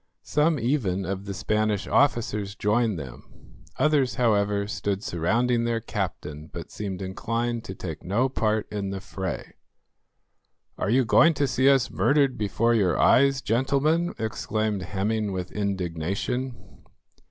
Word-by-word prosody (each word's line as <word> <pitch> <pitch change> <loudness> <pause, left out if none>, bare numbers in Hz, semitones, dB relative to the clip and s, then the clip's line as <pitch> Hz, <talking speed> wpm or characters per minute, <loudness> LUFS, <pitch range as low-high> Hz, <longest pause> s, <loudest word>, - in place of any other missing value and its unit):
Some 150 +1 +2
even 110 -8 0
of 95 +2 -4
the 100 - -4
Spanish 105 0 0
officers 105 -7 +1
joined 110 -1 +1
them, 65 -5 -9 0.5
others, 140 -6 +2
however, 105 -4 +2
stood 100 -1 -3
surrounding 115 +7 +1
their 115 -1 0
captain, 90 -9 -5
but - - -8
seemed 100 -2 -5
inclined 115 +4 -2
to 95 - -6
take 80 -4 -7
no 110 +8 +1
part 110 -4 0
in 100 -2 -3
the 95 0 -4
fray. 95 -1 -5 1.2
"Are - - -2
you 125 +3 +3
going 165 +9 +5
to 140 0 +1
see 130 +1 +3
us 135 -2 +3
murdered 140 -3 +2
before 110 +3 +1
your 95 -7 +2
eyes, 135 0 +4
gentlemen?" 140 - +1
exclaimed 110 -2 -2
Hemming 100 +2 -1
with 90 -1 -4
indignation. 100 +6 -2
110 Hz, 135 wpm, -26 LUFS, 100-125 Hz, 1.2 s, going